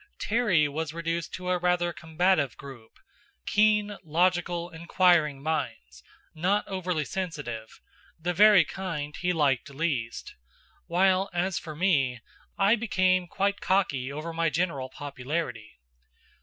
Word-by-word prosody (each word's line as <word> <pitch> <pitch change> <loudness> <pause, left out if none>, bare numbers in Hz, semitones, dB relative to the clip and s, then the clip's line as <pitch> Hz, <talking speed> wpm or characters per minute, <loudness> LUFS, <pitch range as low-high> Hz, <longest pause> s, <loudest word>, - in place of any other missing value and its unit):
Terry 205 -9 +2
was 155 +2 -4
reduced 165 0 -3
to 180 0 -5
a 180 - +1
rather 175 -1 +1
combative 160 -2 +1
group: 130 -5 -12 0.5
keen, 210 -1 +2
logical, 175 +1 +1
inquiring 165 -4 +2
minds, 65 - -3 0.3
not 190 +6 0
overly 180 -5 -2
sensitive, 140 -8 -5 0.4
the 175 +2 -1
very 205 -2 +7
kind 150 -6 -5
he 180 0 -1
liked 145 -4 +1
least; 135 -6 -3 0.5
while, 185 +2 +2
as 175 -2 0
for 155 0 -8
me 145 -8 +1 0.4
I 200 +2 +4
became 185 -5 +1
quite 200 +2 -1
cocky 140 -9 0
over 155 +3 -5
my 165 0 +1
general 155 -6 -1
popularity. 130 - -5
170 Hz, 120 wpm, -27 LUFS, 145-185 Hz, 0.5 s, very